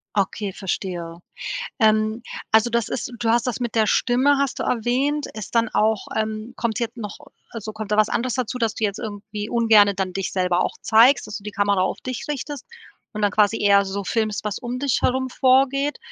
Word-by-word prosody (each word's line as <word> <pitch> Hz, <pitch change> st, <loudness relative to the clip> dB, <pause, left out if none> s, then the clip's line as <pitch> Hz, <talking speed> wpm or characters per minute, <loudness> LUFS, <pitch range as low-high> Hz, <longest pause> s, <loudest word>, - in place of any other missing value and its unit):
Okay, 200 Hz, +1 st, -1 dB
verstehe. 175 Hz, -3 st, -4 dB, 0.6 s
Ähm, 215 Hz, +1 st, +2 dB, 0.3 s
also 220 Hz, +2 st, +4 dB
das 235 Hz, -2 st, 0 dB
ist 250 Hz, -, -4 dB
du 230 Hz, -, 0 dB
hast 235 Hz, +2 st, +2 dB
das 250 Hz, -, -2 dB
mit 235 Hz, -2 st, -3 dB
der 220 Hz, -2 st, +3 dB
Stimme 265 Hz, +4 st, +3 dB
hast 275 Hz, -2 st, -1 dB
du -, -, -1 dB
erwähnt 260 Hz, +6 st, 0 dB
ist 215 Hz, +2 st, -8 dB
dann 230 Hz, -1 st, +3 dB
auch 215 Hz, -1 st, +1 dB
ähm, 220 Hz, +2 st, -3 dB
kommt 225 Hz, -1 st, -1 dB
jetzt 235 Hz, +1 st, -3 dB
noch 210 Hz, -3 st, -6 dB, 0.3 s
also 220 Hz, -2 st, -6 dB
kommt 215 Hz, -1 st, -7 dB
da -, -, +1 dB
was 215 Hz, 0 st, +4 dB
anderes 250 Hz, 0 st, -1 dB
dazu, 255 Hz, -1 st, -2 dB
dass 230 Hz, -3 st, -1 dB
du 220 Hz, -, -4 dB
jetzt 200 Hz, -1 st, -1 dB
irgendwie 210 Hz, -1 st, -6 dB
ungerne 220 Hz, -4 st, +5 dB
dann 185 Hz, -1 st, -2 dB
dich 195 Hz, 0 st, -3 dB
selber 180 Hz, -1 st, +1 dB
auch -, -, -4 dB
zeigst, 235 Hz, +4 st, +5 dB
dass 210 Hz, -, -5 dB
du 200 Hz, -, -14 dB
die 210 Hz, -, -6 dB
Kamera 200 Hz, -2 st, +1 dB
auf 185 Hz, -, -1 dB
dich 255 Hz, -2 st, -5 dB
richtest 285 Hz, -1 st, -5 dB, 0.5 s
und 215 Hz, -, -4 dB
dann 205 Hz, -1 st, +2 dB
quasi 210 Hz, +1 st, +3 dB
eher 200 Hz, -1 st, +5 dB
so 195 Hz, +1 st, -4 dB
filmst, 215 Hz, 0 st, -1 dB
was 210 Hz, -1 st, -3 dB
um 245 Hz, 0 st, -4 dB
dich 275 Hz, -2 st, +1 dB
herum 260 Hz, +1 st, +1 dB
vorgeht? 270 Hz, +2 st, +2 dB
220 Hz, 210 wpm, -22 LUFS, 205-245 Hz, 0.6 s, ungerne